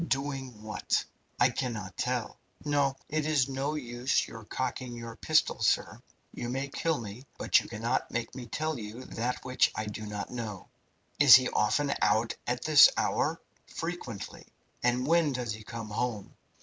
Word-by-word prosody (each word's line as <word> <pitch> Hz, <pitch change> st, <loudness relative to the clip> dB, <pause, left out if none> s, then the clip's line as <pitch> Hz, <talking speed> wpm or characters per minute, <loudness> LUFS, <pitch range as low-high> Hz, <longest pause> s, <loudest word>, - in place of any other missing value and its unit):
"Doing 135 Hz, -5 st, -3 dB
what?" 105 Hz, -2 st, -1 dB, 0.3 s
"I 125 Hz, +1 st, +5 dB
cannot 115 Hz, -7 st, -4 dB
tell. 125 Hz, -2 st, -2 dB, 0.3 s
No, 140 Hz, -2 st, +2 dB
it 155 Hz, 0 st, -1 dB
is 145 Hz, -4 st, +3 dB
no 135 Hz, +3 st, -2 dB
use 125 Hz, -2 st, 0 dB
your 115 Hz, -1 st, -10 dB
cocking 125 Hz, +1 st, -3 dB
your 115 Hz, -1 st, -7 dB
pistol, 155 Hz, +6 st, +2 dB
sir. -, -, +1 dB, 0.3 s
You 120 Hz, -, -4 dB
may 135 Hz, +2 st, -2 dB
kill 160 Hz, +1 st, 0 dB
me, 115 Hz, +4 st, -8 dB
but -, -, +4 dB
you -, -, -9 dB
cannot 115 Hz, +3 st, -1 dB
make 120 Hz, -1 st, -3 dB
me 125 Hz, -2 st, -7 dB
tell 155 Hz, +3 st, -2 dB
you 110 Hz, +4 st, -8 dB
that 120 Hz, +2 st, -3 dB
which 130 Hz, 0 st, +3 dB
I 110 Hz, -, -2 dB
do 105 Hz, 0 st, -6 dB
not 105 Hz, -1 st, -5 dB
know." 110 Hz, -6 st, -6 dB, 0.5 s
"Is 145 Hz, -3 st, +11 dB
he 130 Hz, -1 st, +4 dB
often 140 Hz, +7 st, +1 dB
out 110 Hz, +3 st, +2 dB
at 125 Hz, 0 st, -1 dB
this 155 Hz, -2 st, +9 dB
hour?" -, -, +1 dB, 0.3 s
"Frequently." 165 Hz, -, -6 dB, 0.3 s
"And 125 Hz, +1 st, +1 dB
when 165 Hz, -1 st, +3 dB
does 120 Hz, -3 st, -2 dB
he 110 Hz, 0 st, -9 dB
come 115 Hz, -1 st, -7 dB
home?" 110 Hz, -1 st, -3 dB
125 Hz, 165 wpm, -30 LUFS, 115-135 Hz, 0.5 s, Is